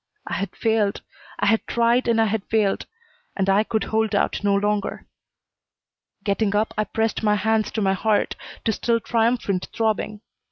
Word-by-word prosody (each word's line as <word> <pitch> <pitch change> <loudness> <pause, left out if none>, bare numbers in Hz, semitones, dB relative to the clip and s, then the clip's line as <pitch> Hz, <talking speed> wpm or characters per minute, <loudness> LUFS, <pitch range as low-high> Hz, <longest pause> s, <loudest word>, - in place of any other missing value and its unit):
I - - -5
had 200 - -3
failed. 220 -3 0 0.3
I - - 0
had 225 - +2
tried, 235 +2 +2
and 230 -1 +3
I 225 - +4
had 215 -1 -1
failed, 215 -3 0 0.5
and 195 -1 +1
I 195 +2 +4
could 220 0 -1
hold 220 -1 0
out 200 - 0
no 200 -1 +3
longer. 205 0 -1 1.2
Getting 205 0 0
up, 215 +2 +1
I 215 - 0
pressed 225 0 -1
my 210 -1 +3
hands 220 +1 +1
to 220 - -1
my 190 0 +3
heart 210 +2 +1 0.3
to 225 - +3
still 230 +2 +1
triumphant 225 -5 0
throbbing. 215 -1 -1
215 Hz, 170 wpm, -23 LUFS, 205-225 Hz, 1.2 s, I